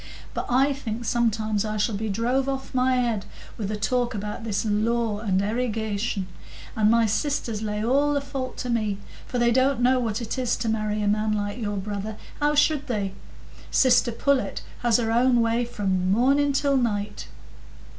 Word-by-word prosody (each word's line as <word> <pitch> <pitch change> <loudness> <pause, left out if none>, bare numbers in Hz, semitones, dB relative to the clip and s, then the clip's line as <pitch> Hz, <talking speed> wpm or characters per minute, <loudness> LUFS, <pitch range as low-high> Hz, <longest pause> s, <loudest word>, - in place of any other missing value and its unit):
But - - -3
I 270 +3 +3
think 240 -4 -5
sometimes 220 -3 +1
I 215 -1 -3
shall 210 +2 +1
be 215 +2 -2
drove 245 +6 0
off 270 0 -4
my 255 0 +2
head 235 -5 0 0.3
with 205 -3 -4
the 215 - -2
talk 245 +3 0
about 210 +2 -5
this 215 -1 -1
law 220 0 0
and 195 -4 +1
erigation; 220 -2 -1 0.5
and 215 -1 +3
my 230 0 +4
sisters 225 -1 -1
lay 210 0 -2
all 285 +4 +2
the - - +2
fault 275 -2 -5
to 250 - -4
me, 215 -4 0 0.3
for 250 - -3
they 240 0 +3
don't 260 +1 +3
know 255 +1 +3
what 225 -3 -1
it 235 +2 -4
is 245 -2 +1
to 230 - -2
marry 215 -1 -1
a - - +1
man 215 +1 +1
like 205 +2 -2
your 205 -3 -2
brother; 205 +2 -4 0.2
how 295 0 +2
should 295 -1 +2
they? 205 -6 -2 0.6
Sister 250 -2 +4
Pullet 275 +3 0 0.2
has 240 -2 +3
her 225 -2 0
own 245 +1 +4
way 230 +1 +1
from 190 -5 -1
morning 275 +6 +3
till 275 0 +2
night." 210 -4 -2
230 Hz, 185 wpm, -25 LUFS, 210-255 Hz, 0.6 s, my